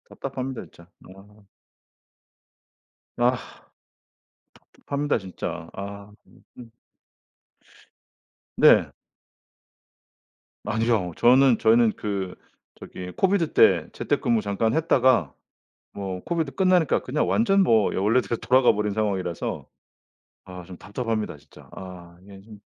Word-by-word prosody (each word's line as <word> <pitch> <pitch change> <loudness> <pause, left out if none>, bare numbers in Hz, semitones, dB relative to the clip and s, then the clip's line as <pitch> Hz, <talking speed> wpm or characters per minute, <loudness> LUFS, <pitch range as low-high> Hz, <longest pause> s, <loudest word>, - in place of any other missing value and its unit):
답답합니다. 130 -1 -6
진짜 85 +1 -17 0.3
아. 105 +2 -19 1.7
아. 125 +1 +2 1.4
답답합니다 145 -1 -2
진짜. 90 -3 -7
아. 100 +1 -8 0.4
음음. 120 -2 -12 1.9
네. - - +5 1.7
아니요. 110 -4 0
저는 125 0 +5
저희는 115 0 +4
그 100 -3 -4 0.5
저기 90 0 -9
COVID 190 -4 +1
때 - - +4
재택근무 115 -2 0
잠깐 105 +2 -1
했다가 130 - +2 0.6
뭐 95 -2 -6
COVID 165 -5 -2
끝나니까 185 -4 +2
그냥 145 +4 -1
완전 200 -3 +3
뭐 110 - +3
예 - - -4
원래대로 115 +4 +1
돌아가 130 0 +4
버린 105 0 -2
상황이라서 95 -5 -3 0.8
아 90 -2 -10
좀 90 +1 -11
답답합니다. 110 - -4
진짜 75 0 -19
아, 90 -2 -11
이게 100 0 -14
좀 105 +1 -14
110 Hz, 235 characters per minute, -24 LUFS, 95-130 Hz, 1.9 s, 네